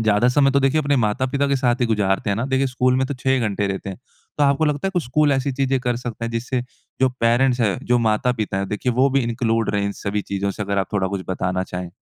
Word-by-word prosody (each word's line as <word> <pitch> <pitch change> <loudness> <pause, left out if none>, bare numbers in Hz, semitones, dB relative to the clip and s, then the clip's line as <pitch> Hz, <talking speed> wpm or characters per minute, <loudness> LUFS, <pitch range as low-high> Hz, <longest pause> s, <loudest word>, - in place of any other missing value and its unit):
ज़्यादा 110 +2 +3
समय 135 +2 +3
तो 140 +1 +2
देखिए 135 +3 +2
अपने 145 -1 +1
माता-पिता 130 +5 0
के 140 - +2
साथ 125 -1 +1
ही 120 - +3
गुज़ारते 100 -2 0
हैं 100 - 0
ना। 115 - -1
देखिए 135 0 +1
स्कूल 130 0 +1
में 130 - +1
तो 140 - -4
6 130 +1 -2
ही 130 -1 +3
घंटे 100 -3 -1
देते 100 0 -4
हैं। 95 - -8 0.4
तो 145 - +4
आपको 140 +2 +3
लगता 150 +4 0
है - - -3
कि - - 0
स्कूल 145 +4 +2
ऐसी 135 0 0
चीज़ें 135 0 0
कर 125 -1 -1
सकता 120 -2 -5
है 115 - -3
जिससे 120 +2 -2 0.4
जो 130 - +5
पैरेंट्स 120 +2 +3
हैं, 105 -4 +1
जो 120 0 +2
माता-पिता 110 -2 0
है 100 - -2
देखिए 105 +5 -2
वो 130 +3 +3
भी 135 - +2
इन्क्लूड 115 -2 0
रहे 100 0 +1
इन 100 - -2
सभी 100 0 -1
चीज़ों 100 0 -1
से। 105 +2 -5
अगर 100 0 -1
आप 95 +2 -2
थोड़ा 95 -2 0
कुछ 95 -1 -4
बताना 95 0 -1
चाहें? 90 -1 -6
120 Hz, 270 wpm, -21 LUFS, 105-135 Hz, 0.4 s, जो